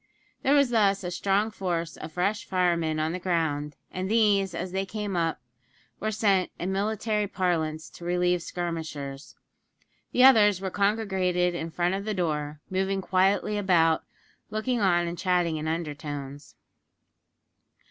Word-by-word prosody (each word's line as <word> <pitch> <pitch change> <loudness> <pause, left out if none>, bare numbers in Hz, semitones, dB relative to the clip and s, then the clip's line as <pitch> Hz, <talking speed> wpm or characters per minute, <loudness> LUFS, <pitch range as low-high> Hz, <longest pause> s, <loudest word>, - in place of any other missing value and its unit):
There 280 - +3
was 280 -4 +4
thus 200 -4 +3
a 180 - -3
strong 200 +4 +1
force 175 -5 -3
of 155 - -9
fresh 200 +5 0
firemen 170 -4 +1
on 155 +1 0
the 180 - -3
ground, 160 -5 -1 0.2
and 185 +1 -3
these, 205 -5 +3
as 180 +2 -4
they 190 +1 -1
came 205 0 -4
up, 165 -2 0 0.6
were 215 - -1
sent 200 -3 +2
in 180 +2 -3
military 210 +1 0
parlance 165 -5 -1
to 170 - -11
relieve 180 0 +1
skirmishers. 155 -5 -5 0.8
The 250 - +4
others 210 -7 +7
were 190 -1 -4
congregated 190 -4 +1
in 165 -1 -4
front 175 +2 0
of 200 +1 -3
the 215 -1 -2
door, 150 -4 -2
moving 190 +1 -1
quietly 195 +3 +1
about, 165 -5 +3 0.5
looking 220 +3 -1
on 175 -3 +3
and 170 0 -5
chatting 175 -3 +1
in 155 +1 -4
undertones. 145 -3 -5
180 Hz, 145 wpm, -27 LUFS, 165-200 Hz, 0.8 s, others